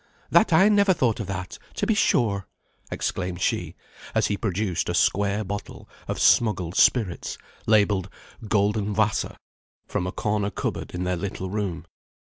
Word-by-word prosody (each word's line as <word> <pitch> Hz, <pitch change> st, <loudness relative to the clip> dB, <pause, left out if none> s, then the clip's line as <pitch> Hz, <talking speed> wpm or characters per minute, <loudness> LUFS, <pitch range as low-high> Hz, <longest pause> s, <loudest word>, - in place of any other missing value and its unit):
That 215 Hz, -, +5 dB
I 170 Hz, +5 st, +6 dB
never 200 Hz, -3 st, +4 dB
thought 120 Hz, -5 st, +1 dB
of 105 Hz, -, -4 dB
that, 95 Hz, -1 st, -5 dB, 0.2 s
to -, -, -1 dB
be 225 Hz, -, +2 dB
sure!" 110 Hz, -, +1 dB, 0.4 s
exclaimed 90 Hz, -2 st, -3 dB
she, -, -, -1 dB, 0.4 s
as -, -, +3 dB
he 105 Hz, -, 0 dB
produced 100 Hz, -4 st, -1 dB
a -, -, -1 dB
square 100 Hz, +1 st, +2 dB
bottle 100 Hz, +1 st, -7 dB, 0.2 s
of -, -, -3 dB
smuggled 95 Hz, -7 st, +3 dB
spirits, 105 Hz, -9 st, +2 dB, 0.3 s
labelled 100 Hz, -3 st, +3 dB, 0.4 s
"Golden 105 Hz, 0 st, +1 dB
Wasser," 110 Hz, +1 st, 0 dB, 0.5 s
from 90 Hz, -, -2 dB
a -, -, -3 dB
corner 105 Hz, 0 st, -1 dB
cupboard -, -, -4 dB
in 90 Hz, -, -2 dB
their 90 Hz, 0 st, -1 dB
little 95 Hz, 0 st, -4 dB
room. 100 Hz, -5 st, -3 dB
100 Hz, 150 wpm, -25 LUFS, 95-110 Hz, 0.5 s, I